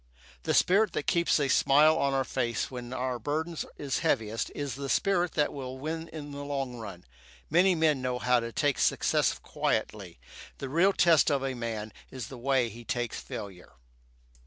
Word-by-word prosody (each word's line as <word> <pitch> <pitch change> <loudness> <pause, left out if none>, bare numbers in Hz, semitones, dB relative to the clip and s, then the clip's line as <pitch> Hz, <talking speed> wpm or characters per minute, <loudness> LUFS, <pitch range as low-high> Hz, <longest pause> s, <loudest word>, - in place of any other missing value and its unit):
The - - 0
spirit 205 +4 +4
that - - -2
keeps 170 -3 +2
a 140 - +1
smile 150 +4 +5
on 140 -3 +1
our 135 - +2
faces 120 -3 -2
when 125 -1 -7
our 125 -1 -2
burden 155 +7 -2 0.2
is 140 -3 -2
heaviest 110 0 0
is 145 -2 -3
the 140 0 -5
spirit 180 +4 +1
that 150 - +1
will 130 -2 -6
win 160 +4 -4
in 145 -3 -8
the 140 0 -6
long 135 -3 -3
run. 100 - -9 0.5
Many 180 +3 +5
men 155 -4 +2
know 125 -1 -1
how 125 0 +2
to 115 0 -5
take 145 +1 0
success - - +2
quietly. - - -3 0.4
The 135 - -5
real 175 +7 +3
test 170 -4 +4
of 140 -2 +1
a 135 -1 -1
man 115 -3 -5 0.2
is 125 -4 -7
he - - -10
way 130 0 +1
he 115 +2 -11
takes 120 -1 -3
failure. 95 -3 -8
135 Hz, 180 wpm, -29 LUFS, 120-155 Hz, 0.5 s, smile